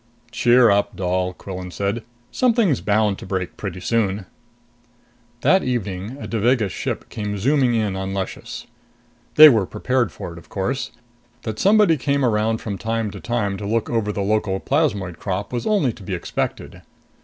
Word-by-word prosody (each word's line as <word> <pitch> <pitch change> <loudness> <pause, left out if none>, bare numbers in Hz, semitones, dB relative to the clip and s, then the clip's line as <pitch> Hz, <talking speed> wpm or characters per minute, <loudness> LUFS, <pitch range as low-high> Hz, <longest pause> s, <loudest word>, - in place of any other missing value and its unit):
"Cheer 120 -1 +5
up, 100 0 +1
Doll!" 90 0 -1
Quillan 90 0 -7
said. 100 +5 -2 0.3
"Something's 230 - +2
bound 105 -1 +1
to - - -9
break 95 -2 -3
pretty 95 -3 -5
soon." 100 -1 0 1.2
That 190 0 +4
evening, 110 -1 -3
a - - -6
Devagas 115 -2 +1
ship - - -4
came 105 -1 -4
zooming 130 +2 +2
in 105 -4 0
on 95 0 -3
Luscious. 95 -1 -5 0.7
They 155 0 +11
were 110 -9 +4
prepared 125 +3 0
for - - -7
it, 85 - -10
of - - -19
course. 125 +8 -2 0.5
That 110 -2 -4
somebody 200 -5 +5
came 140 0 +1
round 110 -1 +1
from 100 -3 -5
time 110 -1 -2
to - - -9
time 105 -5 -1
to 100 - -5
look 115 +1 -1
over 110 -3 0
the 100 -1 -2
local 105 -2 0
plasmoid 105 - 0
crop 100 +3 -3
was 120 -1 -2
only 180 - +2
to - - -15
be 95 -1 -4
expected. 85 - -4
110 Hz, 165 wpm, -21 LUFS, 95-125 Hz, 1.2 s, They